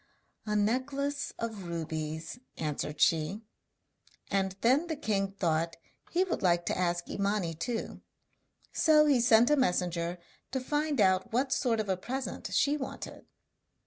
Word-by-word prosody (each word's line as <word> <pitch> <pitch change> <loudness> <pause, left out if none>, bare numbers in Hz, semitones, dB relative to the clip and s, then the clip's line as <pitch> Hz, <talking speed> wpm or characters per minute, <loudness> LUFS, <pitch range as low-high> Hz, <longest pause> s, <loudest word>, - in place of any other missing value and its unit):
'A 210 - 0
necklace 275 +6 0
of 220 -5 -5
rubies,' 160 +3 -4 0.2
answered 150 -1 -3
she. 165 +7 +2 0.9
And 190 -1 0
then 270 +8 +3
the 320 - -2
king 200 -8 -1
thought 165 -3 0 0.3
he 355 +2 +2
would 375 - -2
like 175 -2 +2
to - - 0
ask 175 -1 0
Imani 200 -4 -1
too; 225 +8 -4 0.7
so 305 -2 +5
he 275 -5 +4
sent 235 +2 +5
a - - +6
messenger 180 - 0 0.3
to 265 - -2
find 295 +1 -1
out 190 +2 +3
what 260 +4 +1
sort 230 -4 +1
of 215 - -1
a 190 -1 0
present 260 +8 -5
she 290 +1 +3
wanted. 265 - -7
210 Hz, 145 wpm, -30 LUFS, 175-265 Hz, 0.9 s, a